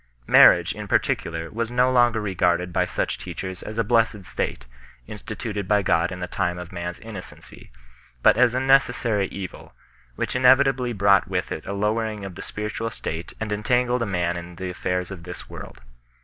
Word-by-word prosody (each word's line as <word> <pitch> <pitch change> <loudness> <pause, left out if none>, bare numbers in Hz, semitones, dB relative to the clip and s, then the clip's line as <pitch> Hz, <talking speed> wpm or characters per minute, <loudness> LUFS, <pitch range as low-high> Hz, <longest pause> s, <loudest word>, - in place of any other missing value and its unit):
Marriage, - - +6
in - - -7
particular, 80 0 -1
was 115 +1 -2
no 125 +1 +2
longer 120 -2 +4
regarded 90 -3 0
by 90 0 +2
such - - -2
teachers 95 -1 -6
as 110 - -7
a 115 - +2
blessed 110 -3 +1
state, 60 - -3 0.4
instituted 105 - -5
by 105 -1 +3
God 85 0 +2
in 90 - -6
the 90 - -4
time 90 0 -1
of 90 -1 -8
man 85 -1 -5
s 90 - -8
innocency, 110 -5 -11 0.5
but - - +6
as 125 -1 +3
a - - +2
necessary 120 -6 +2
evil, 95 -2 -8 0.4
which - - -3
inevitably 130 0 +4
brought 100 -4 +3
with 90 -1 -2
it - - -5
a - - -3
lowering 105 0 -1
of 95 - -7
the - - -9
spiritual 105 +2 -4
state 85 -5 -6
and 110 -1 -4
entangled 125 +4 +1
a 115 - 0
man 90 -2 -1
in 85 0 -8
the 90 +1 -5
affairs 90 +1 -2
of 95 -3 -7
this 90 +1 -9
world. - - -10
100 Hz, 185 wpm, -24 LUFS, 90-115 Hz, 0.5 s, Marriage